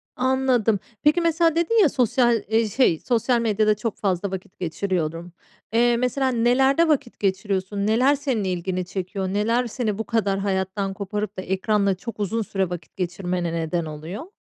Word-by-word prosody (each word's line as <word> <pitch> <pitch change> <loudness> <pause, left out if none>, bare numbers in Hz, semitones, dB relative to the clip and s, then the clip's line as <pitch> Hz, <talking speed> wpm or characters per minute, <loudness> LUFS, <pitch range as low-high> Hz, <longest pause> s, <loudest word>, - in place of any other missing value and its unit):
Anladım. 255 -5 +2 0.2
Peki 305 +4 +4
mesela, 330 -1 +2
dedin 385 +7 +3
ya, 345 - +5
sosyal, 240 -3 +2
eee, 220 +1 +2
şey, 200 -9 +2
"Sosyal 240 0 +1
medyada 215 -2 +2
çok 215 +1 -4
fazla 195 -1 -1
vakit 190 -1 -7
geçiriyorum." 170 -1 -3 0.4
Eee, 240 +1 +4
mesela, 250 +2 0
nelerde 265 +6 +3
vakit 280 -6 0
geçiriyorsun? 195 0 -1
Neler 250 +6 +4
senin 265 -6 -1
ilgini 185 0 -2
çekiyor? 190 +1 -4
Neler 225 +6 +1
seni 220 -3 -2
bu 220 - -2
kadar 205 -4 0
hayattan 195 0 -1
koparıp 205 +1 -4
da - - -2
ekranda 195 +1 +1
çok 225 +4 -8
uzun 215 +3 -1
süre 195 -3 -1
vakit 175 -1 -8
geçirmene 180 -1 -2
neden 165 +1 -1
oluyor? 165 - -7
210 Hz, 160 wpm, -23 LUFS, 190-245 Hz, 0.4 s, ya